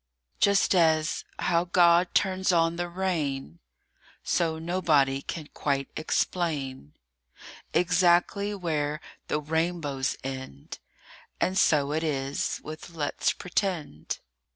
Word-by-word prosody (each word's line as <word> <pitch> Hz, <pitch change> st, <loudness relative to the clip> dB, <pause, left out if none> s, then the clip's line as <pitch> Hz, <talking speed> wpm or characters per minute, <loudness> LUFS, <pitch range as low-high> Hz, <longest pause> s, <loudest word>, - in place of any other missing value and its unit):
JUST 200 Hz, -1 st, +4 dB
as: 160 Hz, -3 st, +2 dB
how 170 Hz, 0 st, +1 dB
God 175 Hz, 0 st, +4 dB
turns 190 Hz, -1 st, +2 dB
on 165 Hz, -1 st, +3 dB
the 175 Hz, 0 st, -3 dB
rain, 150 Hz, -, -2 dB, 0.6 s
So 165 Hz, -2 st, 0 dB
nobody 155 Hz, -5 st, +2 dB
can 155 Hz, +2 st, -6 dB
quite 140 Hz, -2 st, -1 dB
explain 145 Hz, -, -2 dB, 0.8 s
Exactly 180 Hz, +3 st, +2 dB
where 155 Hz, -5 st, -1 dB, 0.3 s
the 150 Hz, -, 0 dB
rainbows 155 Hz, -3 st, -1 dB
end. 130 Hz, -, -7 dB, 0.6 s
And 185 Hz, -, +1 dB
so 145 Hz, -6 st, +3 dB
it 160 Hz, +2 st, -1 dB
is 140 Hz, -3 st, -1 dB
with 155 Hz, +1 st, -8 dB
Let'spretend. 165 Hz, -, -2 dB
160 Hz, 100 wpm, -27 LUFS, 145-175 Hz, 0.8 s, JUST